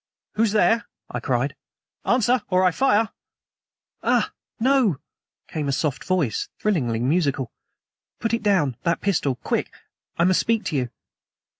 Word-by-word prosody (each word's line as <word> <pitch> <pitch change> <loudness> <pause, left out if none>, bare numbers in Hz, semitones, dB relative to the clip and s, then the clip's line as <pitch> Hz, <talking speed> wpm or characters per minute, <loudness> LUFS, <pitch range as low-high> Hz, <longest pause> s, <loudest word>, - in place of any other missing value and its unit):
"Who's 220 -1 +2
there?" 220 +3 +3 0.3
I - - -2
cried. - - 0 0.5
"Answer, 245 +1 +3
or 185 0 +3
I 185 - +5
fire!" 220 +2 +3 0.9
"Ah! - - +2 0.3
no," 250 - +3 0.5
came 150 -2 -3
a - - +1
soft 140 0 -1
voice, 180 - 0
thrillingly 140 - +1
musical. 140 -2 +1 0.7
"Put 230 - -1
it 230 - +1
down 180 - +2
that 170 -1 0
pistol. 155 -9 +1
Quick! - - -2 0.5
I 170 - +3
must 185 +1 +4
speak 225 -1 +1
to 155 - -2
you." 125 -3 0
185 Hz, 140 wpm, -24 LUFS, 140-220 Hz, 0.9 s, I